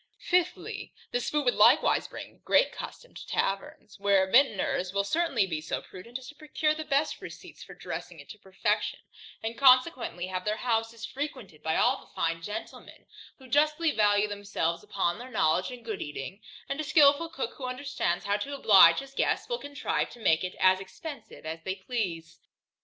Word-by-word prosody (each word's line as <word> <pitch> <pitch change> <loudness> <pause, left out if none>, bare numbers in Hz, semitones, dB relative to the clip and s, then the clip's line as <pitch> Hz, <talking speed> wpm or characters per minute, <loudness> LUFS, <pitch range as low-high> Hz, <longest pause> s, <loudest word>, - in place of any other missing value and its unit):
Fifthly, 360 0 -1 0.2
This 245 - -1
food 295 -2 0
would 245 - +4
likewise - - +4
bring - - -10
great - - +4
custom - - -9
to - - -10
taverns, 195 +1 -3
where 200 -1 +4
the 190 - -11
vintners 205 -7 +3
will 200 0 +1
certainly 275 - +1
be 160 -5 -3
so 160 - -3
prudent 230 +7 -9
as 260 -1 -12
to - - -10
procure 305 0 -1
the 315 0 -5
best 290 0 0
receipts - - -10
for - - -12
dressing - - -7
it - - -12
to 210 - -10
perfection; 190 -1 -1 0.5
and 225 +1 -4
consequently 255 - +4
have 185 0 -4
their 210 +2 -1
houses 225 -1 -1
frequented 255 - -6
by 160 0 -1
all - - +3
the - - -19
fine 165 0 -1
gentlemen, 210 +6 -8 0.3
who 265 - -15
justly 305 +4 +2
value 205 -3 +3
themselves 200 -5 -2
upon 185 0 -1
their 250 +2 -9
knowledge 170 -6 +1
in 250 -2 -9
good 220 -3 -5
eating; 145 +7 -6 0.3
and 275 - -3
a - - -1
skilful 300 +1 +4
cook, 275 -5 -4
who 265 - -6
understands 255 -8 -2
how 205 0 +1
to 280 +7 -5
oblige 190 -10 +7
his 275 0 -12
guests, - - 0
will 485 -1 -2
contrive 285 -1 -2
to 240 - -13
make 160 -7 +2
it 185 - -4
as 185 0 +5
expensive 280 - -9
as 160 +1 -5
they 190 +3 -3
please. 190 -6 -4
225 Hz, 185 wpm, -28 LUFS, 190-280 Hz, 0.5 s, oblige